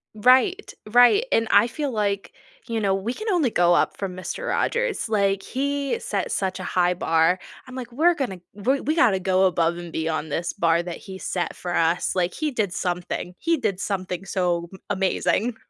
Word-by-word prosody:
Right, 260 - +3
right, 245 - +5
and 225 0 +2
I 235 - +6
feel 285 +2 -3
like, 205 -3 -2 0.3
you 230 -1 -1
know, 195 -2 +1
we 210 +5 -3
can 435 - -5
only 330 - +2
go 175 0 +4
up - - +1
from 190 -2 -4
Mister 185 - -5
Rogers, 480 - 0
like, 200 -2 +1
he 280 - -2
set - - -3
such 190 -1 -1
a - - -5
high 180 0 +1
bar, 165 +1 +2 0.3
I'm 255 - -10
like, 250 -2 -6
"We're 330 +7 +3
gonna 240 - -3
we 255 +7 0
we 310 +2 0
gotta 220 - +4
go 185 0 +2
above 170 -2 +1
and 175 -1 -8
beyond 160 -1 -2
this 165 +2 -2
bar 170 0 +2
that 175 -1 -6
he 190 -1 -9
set 180 -2 -3
for 175 -1 -5
us," 170 +3 +1
like, 180 0 0
he 310 -2 -2
did 205 -7 -1
something, 180 0 -3
he 330 0 +1
did 205 -7 -2
something 185 -2 -3
so 175 -3 -1
m 190 - -11
amazing. 205 +4 0
195 Hz, 195 wpm, -24 LUFS, 180-255 Hz, 0.3 s, I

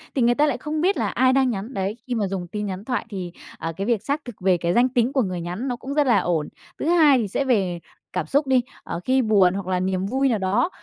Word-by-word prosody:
thì 265 - +1
người 240 +1 +4
ta 295 - +3
lại - - 0
không 305 0 -3
biết 380 +4 +2
là - - 0
ai 260 0 +3
đang 265 -1 +3
nhắn, 220 +3 -4
đấy, 195 +2 -2
khi 245 - -2
mà 210 -4 0
dùng 185 -2 -4
tin 210 +4 -4
nhắn 195 +1 -5
thoại 250 -2 -2
thì, 185 -4 -5 0.3
ờ, 165 0 -4
cái 195 - -3
việc 235 -4 +1
xác 290 +1 -2
thực 245 -4 -8
về 185 -1 +3
cái 170 0 -1
danh 245 +4 +4
tính 245 +1 +1
của 265 - +3
người 185 -4 -3
nhắn 180 +10 -4
nó 245 - -1
cũng 265 +3 -6
rất 295 -1 +2
là 235 -5 +5
ổn. 165 -4 -1 0.3
Thứ - - -3
hai 315 -5 +5
thì 220 -4 -1
sẽ 275 +8 -1
về 190 -8 +1 0.3
cảm 180 -4 -1
xúc 285 - +1
đi, 260 -1 +4 0.2
ờ, 170 - -5
khi 260 +1 +3
buồn 200 -6 +4
hoặc 195 -2 -5
là 185 -1 0
niềm 185 0 -1
vui 265 +6 +1
nào 230 - +1
đó, 195 - +1
225 Hz, 290 wpm, -23 LUFS, 185-265 Hz, 0.3 s, là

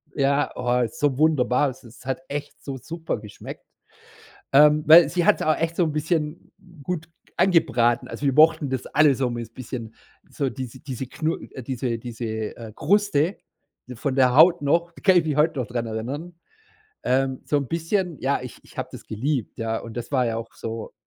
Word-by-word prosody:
ja, 140 0 +1
oh, 125 0 +1
so 135 +3 -1
wunderbar. 145 -3 +3
Es 130 - -11
es 120 +2 -15
hat 135 +6 -3
echt 145 0 -6
so 135 -2 -5
super 165 -2 -5
geschmeckt, 105 -1 -10 0.9
ähm, 150 +2 +6
weil 160 0 +9
sie 175 +1 0
hat's - - +4
auch 155 - +2
echt 165 0 -2
so'n 160 -4 +2
bisschen 155 0 -2 0.3
gut 160 +1 -4 0.3
angebraten. 120 -10 +3
Also 145 - -4
wir 135 - +2
mochten 155 -2 +5
das 130 -2 -2
alle 150 -3 +4
so 125 -1 -1
mit 115 -1 -6
bisschen 115 -3 -7 0.4
so 140 -3 -2
diese 130 -1 -7
diese 130 -1 -6
Knu 155 +5 -2 0.2
äh, 130 - -8
diese 120 -1 -3
diese, 120 0 -7 0.3
äh, 115 -2 -9
Kruste 200 -4 +2 0.6
von 130 +3 -2
der 130 -2 +4
Haut 170 +3 +7
noch, 170 +4 +1
da - - -15
kann 190 -3 +5
ich 165 - +1
mich 150 -2 -1
heute 150 -1 +2
noch 120 - -2
daran 120 -1 -3
erinnern, 135 +10 -5 0.7
ähm, 130 0 +1
so 145 - +1
'n 140 -2 0
bisschen 170 0 -1
ja, 135 0 0
ich 125 - -9
ich - - -19
habe - - -3
das - - -10
geliebt, 125 +2 -2
ja, 115 0 -1
und 115 0 -10
das 120 +4 -6
war 130 -3 +2
ja 115 -1 -1
auch 115 - -8
so 115 0 -6
140 Hz, 190 wpm, -24 LUFS, 120-160 Hz, 0.9 s, weil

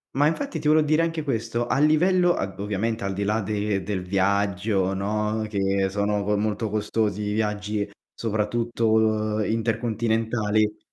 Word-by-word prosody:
Ma 145 +2 +3
infatti 275 - -1
ti 150 - -2
volevo 155 0 +4
dire 155 +2 +3
anche 165 -1 -1
questo 120 -3 -2
a - - +1
livello 175 +4 +4
ad 95 0 -4
ovviamente 105 +3 -2
al 100 0 -2
di 100 +1 -2
là 105 +2 +1
de 105 -1 -1
del 95 -1 -2
viaggio, 95 +1 0
no, 105 +2 -1
che 95 -1 0
sono 105 +1 0
co 105 +1 +1
molto 105 +1 -1
costosi 105 -1 -1
i 105 0 -2
viaggi, 105 -1 -1 0.2
soprattutto 110 -1 0
intercontinentali. 110 -1 0
105 Hz, 150 wpm, -24 LUFS, 100-115 Hz, 0.2 s, volevo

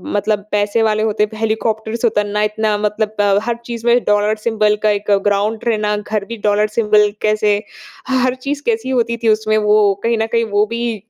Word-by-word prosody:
मतलब 205 0 -1
पैसे 210 +2 +1
वाले 215 0 +1
होते। 215 -1 +1
हेलीकॉप्टर 220 0 -2
से 235 0 +1
उतरना, 210 -1 0
इतना 210 0 0
मतलब 210 -1 0
हर 235 -1 -1
चीज़ 235 -1 -6
में 240 +1 +5
डॉलर 210 +1 +2
सिंबल 215 -1 +1
का 215 - +4
एक 205 0 -2
ग्राउंड 205 +2 +1
रहना, 210 -2 0
घर 210 -1 -3
भी 230 +2 -7
डॉलर 210 +1 +2
सिंबल 210 -2 +3
कैसे 210 -1 +2 0.5
ह 260 -1 +2
हर 255 0 +1
चीज़ 285 +3 -4
कैसी 230 +2 -1
होती 235 -2 0
थी 225 - +3
उसमें 215 0 +2
वो 210 -1 +3
कहीं 230 0 +1
न 220 - 0
कहीं 230 0 +2
वो 205 +1 +2
भी 230 -2 -4
215 Hz, 195 wpm, -17 LUFS, 210-230 Hz, 0.5 s, में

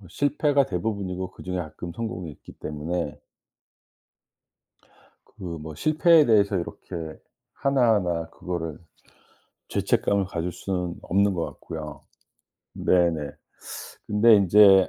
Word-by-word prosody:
어 95 - -14
실패가 145 - +2
대부분이고 95 -1 -3
그중에 90 0 -5
가끔 85 +1 -6
성공이 90 -5 -4
있기 - - -14
때문에 75 0 -4 2.1
그 - - -15
뭐 80 -3 -6
실패에 155 - +5
대해서 100 -4 +4
이렇게 85 0 -6 0.6
하나하나 105 -12 +2
그거를 85 -4 -5 0.9
죄책감을 100 -1 +1
가질 90 -1 -3
수는 90 -2 -3
없는 100 +2 +2
것 85 -2 -1
같고요. 75 -3 -8 0.7
네네. 85 -5 +2 0.8
근데 105 +2 +6
인제 100 0 +7
90 Hz, 240 characters per minute, -25 LUFS, 85-105 Hz, 2.1 s, 인제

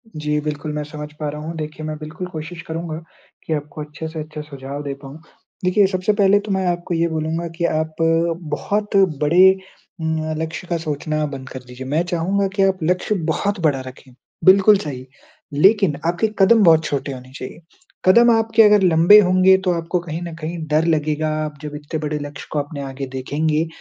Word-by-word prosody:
जी, 150 0 -1
बिल्कुल। 150 0 -4
मैं 150 - -3
समझ 150 0 -8
पा 150 -1 -2
रहा 150 +1 -6
हूँ। 165 +2 -6
देखिए 155 0 -6
मैं 155 0 -4
बिल्कुल 155 +4 -7
कोशिश 165 0 -7
करूँगा 160 -1 -4 0.5
कि 160 - -2
आपको 150 0 -5
अच्छे 150 +2 -7
से 160 0 -7
अच्छे 155 0 -7
सुझाव 140 -1 -7
दे 140 -1 -4
पाऊँ। 135 +3 -10 0.5
देखिए 190 +2 +4
सबसे 185 +2 0
पहले 205 -1 +4
तो 205 0 -6
मैं 190 -1 0
आपको 175 0 -2
ये 165 0 +1
बोलूँगा 160 +1 -2
कि 170 - 0
आप 155 -1 -1
अ, 165 +1 +2 0.2
बहुत 205 +8 -2 0.3
बड़े 185 +5 +5 0.4
उम, 160 0 -1 0.2
लक्ष्य 165 +2 -5
का 170 - -1
सोचना 155 -1 -2
बंद 135 -2 -8
कर 130 - -7
दीजिए। 125 +1 -9
मैं 155 +5 +1
चाहुँगा 190 +4 0
कि 195 - +3
आप 190 -1 +2
लक्ष्य 180 +5 0 0.2
बहुत 200 +4 -1
बड़ा 150 -5 +1
रखें, 130 0 -13 0.3
बिल्कुल 195 +2 +7
सही। 130 -7 -6 0.5
लेकिन 195 +1 +4
आपके 175 +5 +1
कदम 215 +3 +6
बहुत 160 -3 +6
छोटे 140 -1 -2
होने 130 0 -11
चाहिए। 130 - -8 0.5
कदम 235 +5 +6
आपके 225 0 +4
अगर 210 -1 +6
लम्बे 175 +4 +7
होंगे 185 -1 +5
तो 180 - +3
आपको 170 +1 -1
कहीं 165 -1 -6
न 170 -1 -6
कहीं 165 +3 -4
डर 155 +2 +2
लगेगा। 155 -1 0 0.2
आप 150 -1 -7
जब 150 -1 -6
इतने 150 +1 -5
बड़े 150 -1 -3
लक्ष्य 145 -1 -8
को 150 - 0
अपने 145 0 -5
आगे 135 0 -5
देखेंगे 155 +4 0
160 Hz, 195 wpm, -20 LUFS, 150-180 Hz, 0.5 s, बिल्कुल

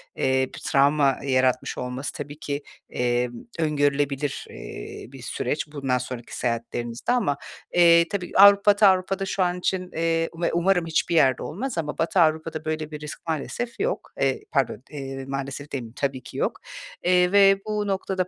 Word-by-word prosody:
eee, 130 0 +1
bir - - -8
travma 140 0 +3
yaratmış 130 -2 +1
olması 125 +3 -4
tabii 145 +1 -7
ki, 145 -1 -4 0.3
emm, 120 0 0 0.3
öngörülebilir, 145 -2 0
eee, - - -8
bir 135 - -11
süreç 145 +5 -2
bundan 135 -4 -1
sonraki 125 -1 -6
seyahatlerinizde. 120 - -2
Ama, 200 - +1 0.4
eee, 170 -1 +6
tabii 185 -3 -3
Avrupa 200 +1 +8
Batı 205 0 +5
Avrupa’da 190 +1 +2
şu 190 0 0
an 180 0 -1
için, 185 0 -1
eee 165 0 0
Ve 170 - +1
umarım 175 +1 +2
hiçbir 165 +1 0
yerde 135 -5 +4
olmaz 225 - -4
ama 150 -2 -3
Batı 170 +3 +1
Avrupa’da 160 -1 +1
böyle 155 0 -3
bir 150 - -6
risk 150 +2 -9
maalesef 165 - -3
yok. - - -2
Eee, 135 -1 +1
pardon, 130 -5 0
eee, 135 -2 -6
maalesef 135 +1 -5
demeyeyim, 120 -4 -5
tabii 135 -3 -2
ki - - -10
yok. - - -1 0.4
Eee, 180 0 +4
ve 195 -1 +6
bu 210 -1 -2
noktada 190 -1 -1
150 Hz, 165 wpm, -24 LUFS, 135-180 Hz, 0.4 s, Avrupa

